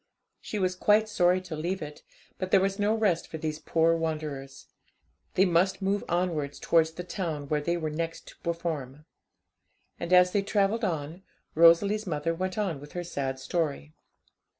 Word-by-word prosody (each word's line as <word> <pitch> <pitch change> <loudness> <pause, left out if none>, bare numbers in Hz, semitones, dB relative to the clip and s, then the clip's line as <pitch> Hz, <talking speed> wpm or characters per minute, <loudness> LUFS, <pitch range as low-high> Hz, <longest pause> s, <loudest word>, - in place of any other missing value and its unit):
She 215 - -5
was 185 -2 0
quite 210 +3 +3
sorry 180 -3 +3
to 180 -3 -7
leave 175 +5 -2
it, 150 -1 -8 0.4
but 185 - -3
there 195 - +5
was 195 +1 0
no 210 +2 +2
rest 205 -7 +1
for 160 - -6
these 155 0 -3
poor 165 +1 +2
wanderers; 150 -4 -4 0.7
they 190 - +5
must 185 +2 +2
move 200 +1 0
onwards 165 -5 -1
towards 160 -1 +2
the 180 - -6
town 165 -6 -4
where 150 -1 +1
they 170 +3 0
were 155 -2 -3
next 165 +1 -4
to - - -17
perform. 155 -4 -4 0.9
And 170 - -5
as 180 0 +6
they 200 - +2
travelled 205 +3 +1
on, 165 -2 -2 0.3
Rosalie's 195 +6 +5
mother 160 0 -1
went 185 +3 -3
on 190 -9 -1
with 145 - -12
her 175 - -3
sad 135 -6 -3
story. 140 - -2
170 Hz, 175 wpm, -28 LUFS, 155-190 Hz, 0.9 s, as